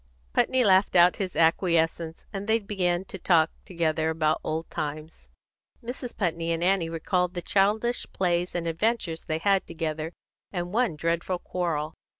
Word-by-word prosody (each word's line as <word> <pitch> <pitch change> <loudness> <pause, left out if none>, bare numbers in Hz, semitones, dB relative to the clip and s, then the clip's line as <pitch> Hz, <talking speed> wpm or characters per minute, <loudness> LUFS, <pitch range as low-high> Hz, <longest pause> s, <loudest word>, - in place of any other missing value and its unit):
Putney 260 -1 +3
laughed 190 -2 +4
out 175 0 +6
his 190 -3 -3
acquiescence, 165 -1 +1
and 195 +1 -5
they 220 +1 +4
began 190 -4 -1
to 190 - -9
talk 165 -3 +3
together 160 -2 0
about 155 -1 +1
old 160 +1 -3
times. 155 - -5 0.5
Mrs. 245 +1 -6
Putney 170 -4 -1
and 165 +1 -1
Annie 180 -2 +2
recalled 180 +2 -1
the 175 - -2
childish 215 +6 +1
plays 180 -1 0
and 170 -1 -1
adventures 165 -1 -1
they 155 -2 -1
had 195 +3 +2
together, 160 0 -3 0.4
and 175 -1 -4
one 235 -7 +1
dreadful 170 +3 -1
quarrel. 165 -4 -2
175 Hz, 150 wpm, -27 LUFS, 160-195 Hz, 0.5 s, out